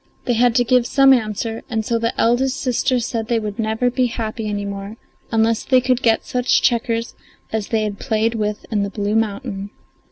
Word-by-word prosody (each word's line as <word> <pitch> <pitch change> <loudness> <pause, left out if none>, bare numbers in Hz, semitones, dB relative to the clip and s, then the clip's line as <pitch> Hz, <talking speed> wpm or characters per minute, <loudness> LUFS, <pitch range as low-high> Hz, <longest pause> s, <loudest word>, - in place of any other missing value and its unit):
They 245 - +1
had 240 0 +3
to 245 - +4
give 245 0 +2
some 270 -1 +6
answer, 225 -1 -1
and 220 -3 -2
so 230 0 0
the 230 +1 -2
eldest 250 +3 +2
sister 255 0 +1
said 225 -1 -3
they 235 -1 +1
never 220 +2 -2
would 245 - +2
be 255 -1 +2
happy 225 -1 -4
any 205 -1 -3
more 200 +2 -6 0.3
unless 225 0 +2
they 260 -1 +4
could 255 0 +1
get 225 -1 +2
such 250 0 +1
checkers 230 -1 0 0.4
as 220 -2 -1
they 220 -2 0
had 205 -2 -4
played 220 +1 0
with 210 -2 -3
in 210 -2 +1
the 200 - -1
blue 205 +1 -2
mountain. 205 -2 -2
225 Hz, 200 wpm, -20 LUFS, 215-245 Hz, 0.4 s, some